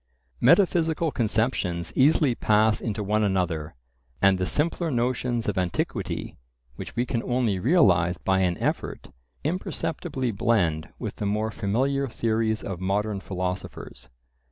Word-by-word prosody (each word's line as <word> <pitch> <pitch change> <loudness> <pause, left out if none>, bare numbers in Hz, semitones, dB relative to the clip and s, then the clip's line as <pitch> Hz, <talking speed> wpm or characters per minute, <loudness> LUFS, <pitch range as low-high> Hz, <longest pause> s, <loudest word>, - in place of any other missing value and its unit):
Metaphysical 170 -3 +3
conceptions 110 -7 -1
easily 140 -1 +4
pass 110 -1 +2
into 110 -2 -3
one 105 +2 +1
another; 85 -7 -1 0.4
and 95 -1 +4
the 90 - 0
simpler 165 +2 0
notions 120 -2 -1
of 100 -2 0
antiquity, 90 -2 -3 0.4
which - - -8
we 120 +1 +1
can 120 -2 -1
only 120 -7 0
realize 90 - +3
by 95 0 +1
an 90 -2 +1
effort, - - -3 0.3
imperceptibly 150 -5 -2
blend 100 -8 +1
with - - -6
the 105 - -2
more 105 +2 0
familiar 135 +8 0
theories 110 -2 -1
of 95 -3 -5
modern 100 +2 -1
philosophers. 90 -1 -5
110 Hz, 130 wpm, -25 LUFS, 95-125 Hz, 0.4 s, easily